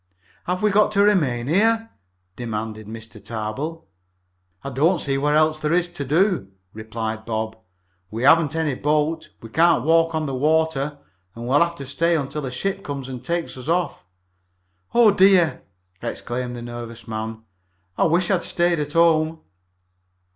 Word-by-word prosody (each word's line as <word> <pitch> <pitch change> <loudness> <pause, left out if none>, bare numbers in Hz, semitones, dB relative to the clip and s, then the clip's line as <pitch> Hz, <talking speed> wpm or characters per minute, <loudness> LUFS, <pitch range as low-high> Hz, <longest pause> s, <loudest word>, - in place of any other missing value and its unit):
"Have 180 +3 -2
we 210 - +4
got 210 +1 +4
to 200 -1 +4
remain 145 -13 +2
here?" 225 - +2 0.4
demanded 110 -2 -5
Mr. 110 -1 -10
Tarbill. 115 +9 -4 0.8
"I 140 - -5
don't 160 +8 +2
see 140 -3 0
what 145 +2 +1
else 155 0 +3
there 150 +1 0
is 175 0 +2
to 175 -5 -6
do," 165 - +1 0.3
replied 110 0 -5
Bob. 110 0 -3 0.5
"We 115 +4 -4
haven't 155 +2 +5
any 160 -3 0
boat, 150 +4 0
we 115 - -9
can't 165 -1 +3
walk 165 0 +3
on 155 -1 -1
the 135 - -3
water, 150 0 +1 0.4
and 120 +1 -7
we'll 140 +3 +4
have 170 0 +2
to 140 - -8
stay 165 +5 +1
until 145 -1 -3
a - - -5
ship 195 +9 -3
comes 140 -2 -5
and 125 -2 -7
takes 170 -1 -2
us 130 - -9
off." 165 - -1 0.9
"Oh, 235 -3 +7
dear!" 190 -4 +4 0.4
exclaimed 125 0 -4
the 120 - -7
nervous 120 -1 -8
man. 110 0 -5 0.5
"I - - +2
wish 175 +3 +2
I - - +5
had 175 - 0
stayed 175 -1 +1
at 150 0 -3
home!" 160 -1 +3
150 Hz, 165 wpm, -22 LUFS, 120-170 Hz, 0.9 s, Oh